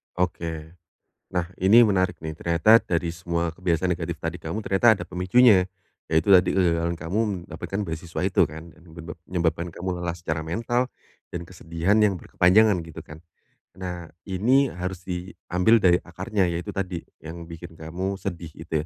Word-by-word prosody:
Oke. 80 -3 -3 0.6
Nah, 90 -2 -1
ini 110 +6 +7
menarik 95 -4 +1
nih. 80 0 -4
Ternyata 85 +8 +4
dari 85 -1 -1
semua 85 -1 -2
kebiasaan 90 +1 0
negatif 85 -1 -3
tadi 85 +3 -4
kamu, 85 +8 -4
ternyata 95 +5 +2
ada - - -5
pemicunya. 95 +2 +4 0.4
Yaitu 80 +4 +1
tadi 95 -2 +6
kegagalan 85 -2 +1
kamu 85 +8 -2 0.3
mendapatkan 100 0 -5
beasiswa 80 -2 -5
itu, - - +2
kan? 80 +2 -9
Dan 85 -2 -18
nyebab 85 0 -9
menyebabkan 85 -1 -1
kamu 90 -1 -4
lelah 85 -1 -2
secara 80 -2 -3
mental 115 +8 0 0.5
dan 85 - -3
kesedihan 85 +3 0
yang 105 -2 +4
berkepanjangan, 100 +4 +4
gitu 80 - -9
kan? 75 +1 -12 0.6
Nah, 90 -2 -6 0.2
ini 125 +8 +3
harus 90 0 -5
diambil 90 +3 +1
dari 90 -1 +5
akarnya, 95 +3 -1
yaitu 85 0 -4
tadi, 90 -3 -3 0.2
yang 85 +1 -8
bikin 85 +1 -9
kamu 90 +5 -4
sedih, 85 -4 -5
gitu 80 -1 -3
90 Hz, 155 wpm, -25 LUFS, 85-95 Hz, 0.6 s, ini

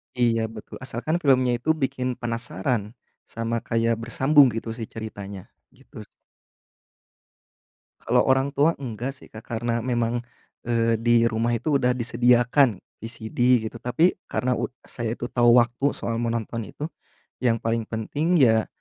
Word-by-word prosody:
Iya, 115 -2 +2
betul. 110 -1 -9
Asalkan 130 +5 -3
filmnya 130 -6 +3
itu 160 +7 +1
bikin 130 -4 -2
penasaran, 115 -2 -2 0.3
sama 115 0 -3
kayak 115 0 +1
bersambung, 135 +6 +4
gitu 115 +1 -4
sih, 115 - -4
ceritanya, 100 -4 -8 0.2
gitu. - - -13 2.0
Kalau 125 +1 +3
orang 135 +1 +3
tua 150 +4 +3
enggak, 125 0 -4
sih, 135 - -16
Kak, 110 0 -11
karena 115 0 -2
memang, 120 -1 -1 0.4
eee, 115 -1 +2
di 120 +1 +2
rumah 115 +1 0
itu 140 +5 +1
udah 125 -2 +2
disediakan, 120 -1 +3 0.2
VCD, 115 +1 +1
gitu. - - -10
Tapi 140 +10 +2
karena 125 0 -1
u - - -3 0.2
saya 115 -2 -3
itu 120 - -5
tahu 120 0 +5
waktu, 120 +4 +1
soal 115 -1 -3
menonton 115 -1 -2
itu, 150 +9 -6 0.5
yang 120 -3 +2
paling 115 0 -1
penting 145 +10 -1
ya, 110 -5 +4
120 Hz, 140 wpm, -24 LUFS, 115-130 Hz, 2.0 s, tahu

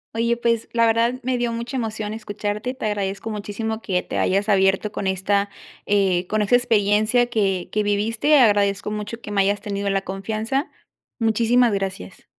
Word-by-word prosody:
Oye, 235 +1 +1
pues, 230 -1 0
la 230 -1 +4
verdad 230 +3 +2
me 255 0 -1
dio 240 -1 -1
mucha 235 +3 -4
emoción 220 -3 -3
escucharte. 210 +2 -4
Te 255 - -6
agradezco 200 +1 -3
muchísimo 215 +1 -4
que 185 -5 -1
te - - -5
hayas 200 +3 +1
abierto 195 +1 +2
con 205 - -4
esta, 200 +2 0 0.4
eh, 190 -3 +2
con 215 +2 0
esta 210 +4 +3
experiencia 225 0 +2
que 195 -6 0
que 210 - 0
viviste. 220 +8 +2
Agradezco 205 -4 +3
mucho 210 +2 -5
que - - -9
me 205 -1 +2
hayas 200 +1 +1
tenido 200 -1 -3
la 195 0 +1
confianza. 220 - -3 0.5
Muchísimas 230 +1 +3
gracias. 190 - -5
210 Hz, 170 wpm, -22 LUFS, 200-230 Hz, 0.5 s, la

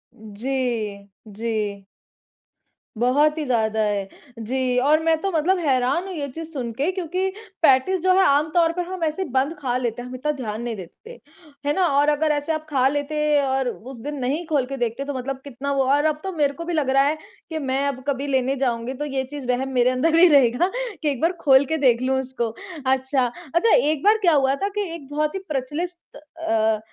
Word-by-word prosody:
जी, 220 -2 -3 0.2
जी। 210 -2 -3 1.1
बहुत 290 +6 +3
ही 310 - -1
ज़्यादा 220 -3 +1
है। 200 -2 -1 0.3
जी 250 +2 -1
और 300 +4 +4
मैं 325 0 +4
तो 390 - -1
मतलब 340 +4 +2
हैरान 270 +2 +1
हूँ 375 - -6
ये 290 -4 -3
चीज़ 320 +4 -7
सुन 245 -4 -3
के 285 +10 0
क्योंकि 370 +1 -2 0.3
पैटीज़ 320 +6 +4
जो 370 0 +4
है - - +6
आम 290 +1 +3
तौर 335 -1 +4
पर 360 - -2
हम 370 -2 -5
ऐसे 315 +4 -1
बंद 270 +3 0
खा 250 -4 -1
लेते 245 -1 -3
हैं, 250 - -8
हम 255 - -7
इतना 300 +4 -1
ध्यान 230 -6 -5
नहीं 235 -1 -3
देते 215 - -11 0.5
है 290 - +2
ना 375 -2 +3
और 290 +1 +4
अगर 300 +1 +2
ऐसे 290 +2 -1
आप 310 0 -4
खा 265 -2 +3
लेते 290 +2 -2 0.2
और 265 -1 0
उस 245 +1 -9
दिन 295 +2 -4
नहीं 285 +7 -1
खोल 285 -5 +1
के 275 +1 -6
देखते 240 +3 -2
तो 285 - -4
मतलब 260 +1 -4
कितना 280 0 -5
वो 270 -1 +2
और 290 +2 +2
अब 305 -1 +1
तो 385 - -3
मेरे 290 -3 +1
को 335 +4 -7
भी 350 - -3
लग 300 -4 0
रहा 270 +1 +4
है 290 +3 +2 0.3
कि 320 -1 -3
मैं 270 0 0
आब 260 -2 -3
कभी 280 0 -1
लेने 265 0 +1
जाऊँगी 235 +1 -2
तो 295 +3 -4
ये 270 -2 -2
चीज़ 270 -1 -8
वहम 265 +2 -1
मेरे 245 0 +4
अंदर 255 +6 +1
भी 350 +2 +8
रहेगा 280 +5 +4 0.3
कि 300 - +1
एक 260 - -5
बार 335 +2 +3
खोल 270 0 +5
के 320 +3 -1
देख 250 -4 +3
लूँ 265 +1 +1
उसको 250 -3 -3 0.4
अच्छा, 265 0 +2 0.3
अच्छा 445 +7 +4
एक 310 - +1
बार 425 +2 +5
क्या 345 -4 +4
हुआ 270 -1 +3
था 395 - -2
कि 415 - 0
एक 290 -5 -9
बहुत 300 +3 -1
ही - - -2
प्रचलित 305 +6 -4
अ, 225 -9 -1
275 Hz, 220 wpm, -23 LUFS, 250-310 Hz, 1.1 s, भी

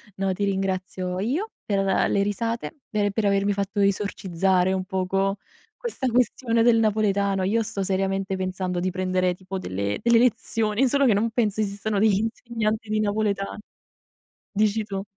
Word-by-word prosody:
No, 195 0 0
ti 200 +2 -3
ringrazio 185 -1 -2
io 285 - -1 0.2
per 200 -2 0
le 195 +1 +2
risate, 230 +6 -2 0.2
e 205 -2 +1
per 210 +1 -1
avermi 200 0 +2
fatto 200 +1 -2
esorcizzare 190 -2 +1
un 185 -1 -1
poco 195 +1 0 0.4
questa 445 - -3
questione 240 -1 +1
del 235 -1 +5
napoletano. 200 -3 +1
Io 225 +4 +1
sto 200 -2 -3
seriamente 195 0 -1
pensando 185 -1 -2
di 185 +1 -1
prendere 185 0 0
tipo 185 +1 -7
delle 100 - -3
delle 235 -1 +5
lezioni, 225 0 +1
solo 280 +2 +3
che 235 - +5
non 225 +3 +1
penso 220 -3 0
esistano 205 0 -1
degli 210 -1 +4
insegnanti 225 -1 -2
di 215 0 +1
napoletano. 205 -1 -1 0.9
Dici 215 +1 +2
tu. 195 -2 -4
200 Hz, 155 wpm, -24 LUFS, 190-220 Hz, 0.9 s, del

